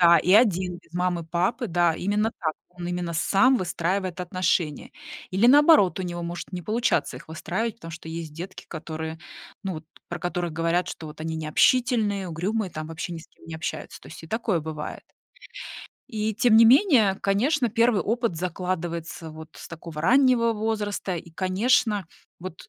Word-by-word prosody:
Да, 170 -1 +7
и 180 +4 +2
1, 185 -5 +4
без - - -28
мамы, 175 -1 -1
папы, 185 +9 0
да, 175 -2 +2
именно 210 +5 0
так, 160 -4 -1 0.2
он 175 0 -8
именно 175 -1 -3
сам 230 +10 +3
выстраивает 185 0 -2
отношения. 175 -4 -1 0.4
Или 200 +6 +4
наоборот, 290 - +6
у - - -2
него 175 -1 -4
может 170 +1 -6
не 180 -1 -4
получаться 215 - 0
их - - -12
выстраивать, 215 +8 -3
потому 165 - -10
что 160 0 -9
есть 160 -2 -6
детки, 175 +5 -8
которые, 160 0 -6 0.5
ну, 190 - -2
вот 160 -1 -7 0.2
про 175 0 -6
которых 175 -1 -2
говорят, 165 +2 0
что 160 - -7
вот 150 - -12
они 160 0 -3
необщительные, 205 +5 +2
угрюмые, 190 +5 -2
там, 155 -1 -6
вообще 165 +2 -5
ни 170 - -5
с 160 - -13
кем - - -23
не 165 -1 -6
общаются. 160 - -5
То - - -15
есть 165 - -11
и 160 - -11
такое 220 -5 0
бывает. 155 -1 -6 1.0
И 220 -3 -2
тем 235 0 +4
не 230 - +8
менее, 240 - +5
конечно, 245 +7 +2
1 230 -1 +3
опыт 230 -4 -1
закладывается 170 -2 -4
вот 160 0 -10
с - - -10
такого 165 -2 -8
раннего 245 +2 +4
возраста, 210 -3 -2
и, 170 0 -9
конечно, 200 +2 +1 0.3
вот 180 -1 -9
180 Hz, 175 wpm, -25 LUFS, 165-220 Hz, 1.0 s, не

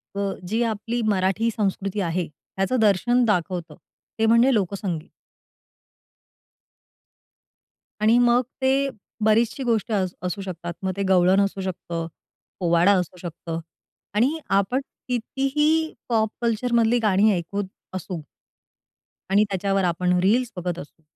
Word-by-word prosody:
प 200 0 0 0.2
जी 225 +5 0
आपली 230 +1 -2
मराठी 200 +3 +1
संस्कृती 200 -1 -1
आहे, 170 +1 -1
त्याचं 195 - -3
दर्शन 220 +4 +3
दाखवतं 175 -5 -1 0.4
ते 220 - +3
म्हणजे 235 +4 +5
लोकसंगीत. 190 -5 -2 2.9
आणि 225 +3 +5
मग 240 0 +4 0.2
ते 270 +1 +2 0.3
बरीचशी 225 +4 +2
गोष्टी 230 -2 0
अस 185 -3 0
असू 180 +2 -3
शकतात. 175 -2 -5
मग 190 - 0
ते 200 - 0
गवळण 185 +1 +5
असू 195 -1 -1
शकतं, 170 -3 -4 0.5
पोवाडा 170 +1 +4
असू 180 +1 -5
शकतं 165 -1 -5 0.6
आणि 260 +9 +2 0.2
आपण 245 +8 0 0.3
कितीही 280 +6 0 0.2
पॉप 220 -2 +2
कल्चर 235 +1 0
मधली 235 +1 +4
गाणी 210 0 +4
ऐकूत 200 +4 -3 0.3
असू. 180 -2 -5 1.1
आणि 205 +2 +5
त्याच्यावर 195 0 0
आपण 180 +1 +1
रील्स 235 +6 +2
बघत 180 -1 -3
असू 150 +3 -12
200 Hz, 120 wpm, -24 LUFS, 180-235 Hz, 2.9 s, म्हणजे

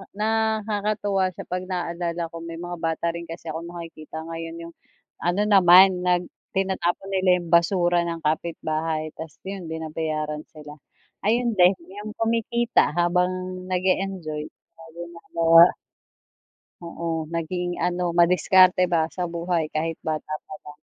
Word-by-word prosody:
na 220 +1 +1
nakakatuwa 205 -2 0
siya - - -7
pag 180 0 -2
naalala 170 -2 -3
ko 165 - -7
may 165 0 -7
mga 175 0 -5
bata 165 0 -1
rin 170 0 -7
kasi 165 0 -8
ako 165 +2 -6
nakikita 165 -2 -8
ngayon 165 0 -6
yung 170 - -17 0.5
ano 175 +4 0
naman 185 -2 +6
nag 180 0 +2 0.3
tinatapon 190 0 -1
nila 185 -1 +3
yung 170 - -9
basura 175 0 +3
ng 165 -1 -5
kapitbahay 155 0 -2
tas 160 -5 -9
yun 190 -3 -6
binabayaran 155 -1 -3
sila. 150 -1 -12 0.5
Ayun 235 +2 +2
din 185 0 +5 0.2
yung 215 +1 -7
kumikita 230 -6 +1
habang 175 +1 +2 0.4
nag-eenjoy. 185 -4 -1 2.4
Oo, 165 -1 -3
naging 175 +2 -3
ano 175 -1 0
madiskarte 180 +1 +5
ba 160 -2 +2
sa 180 +3 -5
buhay 170 -1 -1
kahit 160 +1 -2
bata 155 -1 -3
pa - - -9
lang. 150 0 -11
175 Hz, 130 wpm, -24 LUFS, 165-185 Hz, 2.4 s, naman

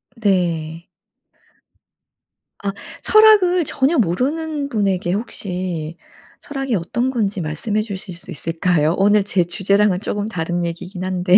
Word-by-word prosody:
네. 170 -6 0 1.8
아. 200 - 0 0.3
철학을 410 -6 +5
전혀 280 +4 +1
모르는 280 - 0
분에게 195 -6 0
혹시 180 -6 -4 0.4
철학이 270 -4 -3
어떤 235 +8 -1
건지 205 -5 -1
말씀해 170 +8 -1
주실 200 -3 -6
수 170 - -11
있을까요? 165 0 +1
오늘 205 +1 +4
제 195 -2 +1
주제랑은 195 +2 +2
조금 205 0 -3
다른 175 -3 -2
얘기긴 180 +2 -6
한데. 185 0 +4
195 Hz, 255 characters per minute, -20 LUFS, 175-230 Hz, 1.8 s, 철학을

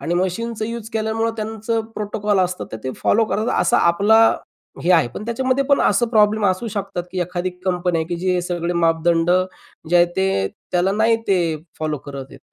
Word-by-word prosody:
आणि 170 - -2
मशीनचं 215 +5 -2
यूज 230 -1 -6
केल्यामुळं 220 +1 0
त्यांचं 220 +1 -2
प्रोटोकॉल 210 -1 -1
असतं, 180 0 -1
तर - - -3
ते 130 - -2
फॉलो 225 +1 +2
करतात 215 +2 -1
असा - - +3
आपला 205 +6 +4 0.6
हे 175 - +1
आहे. 165 -8 +4
पण 210 - -6
त्याच्यामध्ये 260 +3 0
पण 280 0 +3
असं 220 +4 +2
प्रॉब्लेम 215 -2 +3
असू 190 +5 0
शकतात, 200 -4 -4
की 185 - -2
एखादी 180 +1 -2
कंपन्या 180 -2 0
आहे, 160 - -3
की 175 - -2
जे 185 +2 0
हे 180 - +1
सगळे 175 -1 -2
मापदंड 165 0 +2 0.6
जे 175 - +5
आहेत, 175 0 +5
ते 190 - +1 0.2
त्याला 180 +2 +2
नाही 225 +2 +3
ते 170 -5 +2 0.2
फॉलो 155 -2 -2
करत 140 -1 -6
आहेत. - - -13
190 Hz, 190 wpm, -20 LUFS, 175-220 Hz, 0.6 s, जे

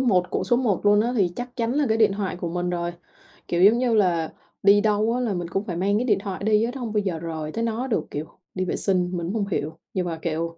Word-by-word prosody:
một 190 -9 +2
của - - -1
số 240 - +3
một 220 -6 0
luôn 205 0 +6
á 235 +3 0
thì 195 -5 +3
chắc 245 +1 -6
chắn 230 0 0
là 290 +2 +2
cái 220 - +2
điện 215 -3 +4
thoại 195 -2 -3
của 175 -1 -4
mình 180 +1 -2
rồi. 175 -1 -2 0.6
Kiểu, 175 +1 +2
giống 215 +4 +7
như 245 -2 +2
là 175 -6 +2 0.3
đi 205 +1 +6
đâu 215 +1 +2
á 250 - 0
là 235 -5 0
mình 175 -2 -3
cũng 195 +3 -2
phải 190 -5 -4
mang 195 +4 +1
cái 245 - 0
điện 225 - +2
thoại 195 -2 -5
đi 215 0 +3
á, 235 - -1
nó 265 - -5
hông 225 -2 -4
bao 210 - +2
giờ 185 -5 -2
rời 160 -2 -5
tới 230 - -2
nó 230 +3 -1
được. 225 - 0
Kiểu 150 +2 -3 0.3
đi 185 0 -1
vệ - - -1
sinh, 180 -2 +1
mình 170 - -3
cũng 190 - -3
hông 210 -3 -1
hiểu, 155 -5 -3 0.2
nhưng 185 -2 -1
mà, 165 -2 -4
kiểu 165 0 -3
200 Hz, 295 wpm, -24 LUFS, 175-225 Hz, 0.6 s, giống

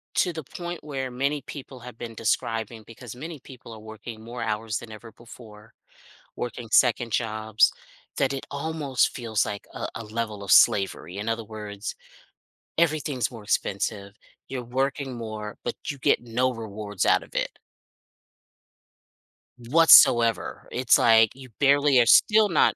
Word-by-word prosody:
to 180 - +1
the 160 -1 -6
point 175 +4 -7
where 135 -3 -4
many 140 +4 -1
people 135 -1 -10
have 125 -1 -11
been 115 -1 -7
describing 115 0 -2
because 115 0 -10
many 155 +3 -8
people 125 -3 -13
are 110 - -10
working 110 +1 -10
more 120 +1 -7
hours 110 0 -2
than 115 - -11
ever 110 +1 -11
before, 110 -1 -15 0.6
working 120 -1 -5
second 120 0 +3
jobs, 110 -1 +2 0.5
that 135 -1 +1
it 135 - -5
almost 145 -2 -1
feels 110 -4 -1
like 105 -2 -6
a - - -4
a 115 - -6
level 110 -1 -4
of 95 - 0
slavery. 95 -3 +3
In 105 +2 -4
other 115 0 -2
words, 105 -1 -7 0.8
everything's 150 -7 0
more 115 -3 -10
expensive, 100 -1 -2 0.4
you're 130 -2 -4
working 135 +2 -2
more, 110 -2 -6
but - - -2 0.2
you 145 - -6
get - - +2
no 125 +2 0
rewards 105 -4 -4
out - - +3
of - - -19
it - - -1 2.1
whatsoever, 120 -3 +5
it's 125 -1 +3
like 115 -2 +5
you 130 -1 -12
barely 140 -1 +4
are 120 - +5
still 215 - +6
not 170 - +3
115 Hz, 150 wpm, -25 LUFS, 110-135 Hz, 2.1 s, still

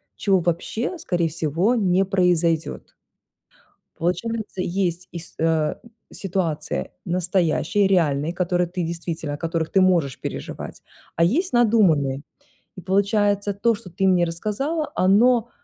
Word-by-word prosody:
чего 195 -2 +2
вообще 175 - -2
скорее 175 - 0
всего 165 - 0
не 195 -3 +2
произойдёт. 175 -4 0 1.0
Получается 190 +3 -2
есть 180 -1 -2
ис 170 -1 -8
э, 160 -1 +1 0.4
ситуации 180 -5 -2
настоящие, 180 +1 +1
реальные, 160 -5 +1
которые 180 0 0
ты 180 +1 -3
действительно, 165 -2 -4
о - - -4
которых 165 0 -2
ты 195 - +3
можешь 170 -8 +2
переживать, - - -6 0.3
а 165 - +4
есть 320 - +1
надуманные. 180 - +3 0.5
И - - -7
получается 200 +2 +1
то, 230 +4 +2
что 205 -3 -10
ты 195 +3 0
мне 180 -2 +4
рассказала, 220 - -2
оно, 230 +5 +3
180 Hz, 125 wpm, -23 LUFS, 165-205 Hz, 1.0 s, а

